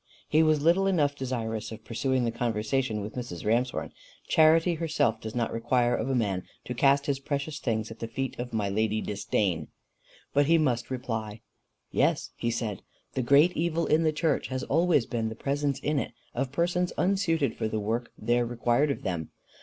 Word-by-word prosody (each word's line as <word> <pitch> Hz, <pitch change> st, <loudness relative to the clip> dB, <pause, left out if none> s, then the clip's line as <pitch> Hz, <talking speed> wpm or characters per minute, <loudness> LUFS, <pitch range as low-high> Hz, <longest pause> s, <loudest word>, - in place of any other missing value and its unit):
He 155 Hz, -, +4 dB
was 155 Hz, -2 st, +3 dB
little 180 Hz, +4 st, +4 dB
enough 150 Hz, -7 st, +2 dB
desirous 115 Hz, -5 st, -3 dB
of 110 Hz, -, -9 dB
pursuing 130 Hz, +2 st, 0 dB
the 115 Hz, -, 0 dB
conversation 115 Hz, 0 st, -1 dB
with 105 Hz, +2 st, -6 dB
Mrs. 120 Hz, -9 st, -6 dB
Ramshorn: 120 Hz, +4 st, 0 dB, 0.4 s
Charity 160 Hz, +2 st, +5 dB
herself 160 Hz, -9 st, 0 dB
does 110 Hz, +1 st, -6 dB
not 120 Hz, -1 st, -1 dB
require 120 Hz, +1 st, +1 dB
of 130 Hz, -, -2 dB
a 135 Hz, -, +1 dB
man 100 Hz, -6 st, 0 dB, 0.2 s
to 125 Hz, -, -3 dB
cast 140 Hz, +2 st, +3 dB
his 140 Hz, -2 st, 0 dB
precious 140 Hz, +2 st, -3 dB
things 110 Hz, -2 st, -2 dB
at 110 Hz, -, -10 dB
the 115 Hz, -, -4 dB
feet 130 Hz, +3 st, -4 dB
of 120 Hz, 0 st, -4 dB
my 105 Hz, -3 st, 0 dB
lady 110 Hz, +2 st, 0 dB
Disdain; 100 Hz, -6 st, -1 dB, 0.7 s
but 145 Hz, 0 st, +3 dB
he 165 Hz, +1 st, +5 dB
must 125 Hz, -7 st, 0 dB
reply. 110 Hz, -4 st, -4 dB, 0.5 s
"Yes," -, -, +1 dB
he 115 Hz, -, -2 dB
said, 110 Hz, -4 st, -3 dB, 0.3 s
"the 130 Hz, -, 0 dB
great 140 Hz, +8 st, +5 dB
evil 170 Hz, 0 st, 0 dB
in 155 Hz, +2 st, +3 dB
the 160 Hz, -1 st, +3 dB
church 155 Hz, +1 st, 0 dB
has 130 Hz, -1 st, -3 dB
always 165 Hz, -4 st, +3 dB
been 115 Hz, -2 st, -2 dB
the 110 Hz, -, -7 dB
presence 140 Hz, +2 st, -1 dB
in 145 Hz, +1 st, 0 dB
it -, -, -4 dB, 0.2 s
of 130 Hz, +1 st, -2 dB
persons 175 Hz, +3 st, 0 dB
unsuited 180 Hz, -6 st, +1 dB
for -, -, -1 dB
the 110 Hz, 0 st, -2 dB
work 115 Hz, +3 st, -2 dB
there 120 Hz, 0 st, +1 dB
required 120 Hz, +4 st, +1 dB
of 140 Hz, -, -3 dB
them. 85 Hz, -4 st, -3 dB
125 Hz, 190 wpm, -28 LUFS, 110-150 Hz, 0.7 s, Charity